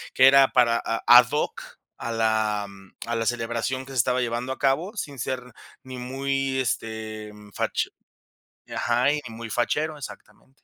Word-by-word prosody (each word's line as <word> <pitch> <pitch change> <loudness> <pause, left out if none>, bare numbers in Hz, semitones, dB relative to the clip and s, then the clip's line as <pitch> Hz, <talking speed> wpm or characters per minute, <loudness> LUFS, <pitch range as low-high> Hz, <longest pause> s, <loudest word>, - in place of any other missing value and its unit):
que 130 +1 +7
era 135 0 +7
para 120 -2 +3
a 115 0 -2
ad 120 0 +9
hoc 150 - -1 0.4
a 115 - -4
la 110 -2 +1 0.4
a 115 0 -2
la 115 -1 -1
celebración 120 +2 -2
que 135 - -11
se 135 - -6
estaba 125 +2 +2
llevando 120 +2 -2
a - - -11
cabo, 165 - 0
sin 145 -7 -5
ser 130 +2 -2 0.4
ni 130 -1 -8
muy, 135 +1 -1
este, 110 -2 -4 0.2
fache - - -1 0.8
Ajá, 120 +3 +1
ni 150 +1 +2
muy 115 0 -7
fachero. 150 +7 -1
Exactamente. 140 -1 -11
125 Hz, 160 wpm, -25 LUFS, 115-135 Hz, 0.8 s, ad